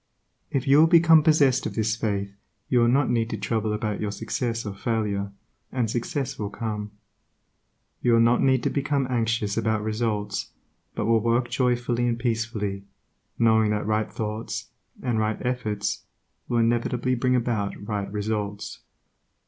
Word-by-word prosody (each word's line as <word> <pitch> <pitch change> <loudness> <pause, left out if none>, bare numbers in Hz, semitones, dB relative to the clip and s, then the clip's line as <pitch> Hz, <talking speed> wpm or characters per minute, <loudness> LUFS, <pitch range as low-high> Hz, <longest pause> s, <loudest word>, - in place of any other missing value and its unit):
If 135 0 -2
you 140 +2 +6
will 160 - +7
become 165 -1 +6
possessed 145 -4 +3
of - - -7
this 110 -1 +1
faith 100 -3 -2 0.3
you 125 - +3
will 120 - +4
not 130 +1 +3
need 115 -1 +1
to 110 - -3
trouble 110 +1 -1
about 105 -1 -2
your 105 - -1
success 115 +2 -3
or 100 - -4
failure, 100 -2 -2 0.4
and 120 -4 -1
success 125 +3 -3
will 105 -1 -2
come. 105 0 -4 1.1
You 120 - +3
will 115 - +5
not 115 +1 +4
need 130 -3 +3
to - - 0
become 140 -1 0
anxious 115 -3 0
about 110 -1 0
results, 110 -1 -2 0.5
but 105 - -1
will 115 0 +4
work 120 +2 +1
joyfully 120 -1 +1
and 120 -1 0
peacefully, 115 -4 -2 0.5
knowing 110 -2 +4
that 105 -1 -1
right 110 0 0
thoughts 110 0 -4 0.3
and 120 -4 0
right 110 0 0
efforts 105 -5 -2 0.5
will 120 - +1
inevitably 120 +2 +1
bring 125 +1 +1
about 115 -5 -1
right 100 -2 -3
results. 105 -1 -3
115 Hz, 155 wpm, -25 LUFS, 105-120 Hz, 1.1 s, will